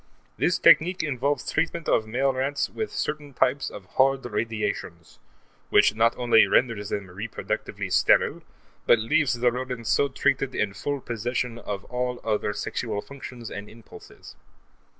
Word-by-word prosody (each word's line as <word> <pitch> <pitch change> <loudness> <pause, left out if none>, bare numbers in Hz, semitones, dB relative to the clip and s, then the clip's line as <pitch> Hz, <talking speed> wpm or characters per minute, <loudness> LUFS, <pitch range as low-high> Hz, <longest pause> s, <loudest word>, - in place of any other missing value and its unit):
This - - +1
technique 180 +3 +5
involves 140 0 -1
treatment 165 -1 -1
of 110 - +2
male 135 +4 +1
rats 135 +2 -1
with 220 - -4
certain 150 -2 -4
types 135 +3 +1
of 100 - -10
hard 135 0 +3
radiations, 115 -1 -4 0.5
which - - +5
not 115 +2 +2
only 120 -2 +5
renders 110 -5 +1
them 100 - -3
reproductively 100 +5 -5
sterile - - +3 0.5
but - - +7
leaves 125 +5 +1
the 120 0 +2
rodents 125 -2 -4
so 140 - +3
treated 135 0 0
in 100 -2 0
full 140 +7 -3
possession 120 +1 -3
of 100 -3 -5
all 125 0 -3
other 105 -2 0
sexual 105 +1 -3
functions 125 -4 -9
and 100 +1 -7
impulses. 115 -1 -14
125 Hz, 145 wpm, -25 LUFS, 110-135 Hz, 0.5 s, but